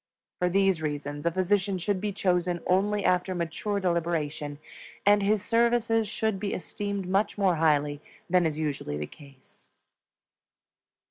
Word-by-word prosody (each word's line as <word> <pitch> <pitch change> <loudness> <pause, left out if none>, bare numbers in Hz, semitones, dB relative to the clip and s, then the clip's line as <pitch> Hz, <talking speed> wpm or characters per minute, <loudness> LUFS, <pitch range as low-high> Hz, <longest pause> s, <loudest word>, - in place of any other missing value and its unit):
For 180 - +2
these 195 -2 +2
reasons 145 0 -3
a - - +3
physician 190 +2 +1
should 185 +1 -1
be 210 0 -1
chosen 180 -2 0
only 200 +2 +1
after 180 +1 +2
mature 175 +5 -2
deliberation, 165 -5 -1 0.5
and 205 0 +5
his 205 0 +1
services 230 -1 +2
should 215 -1 -1
be 200 -1 -2
esteemed 200 +1 -4
much 195 +4 +1
more 190 -4 +2
highly 150 -2 +2 0.3
than 180 -1 +3
is 155 -1 -3
usually 145 - -2
the 75 - -3
case. 140 - -17
180 Hz, 140 wpm, -27 LUFS, 155-205 Hz, 0.5 s, and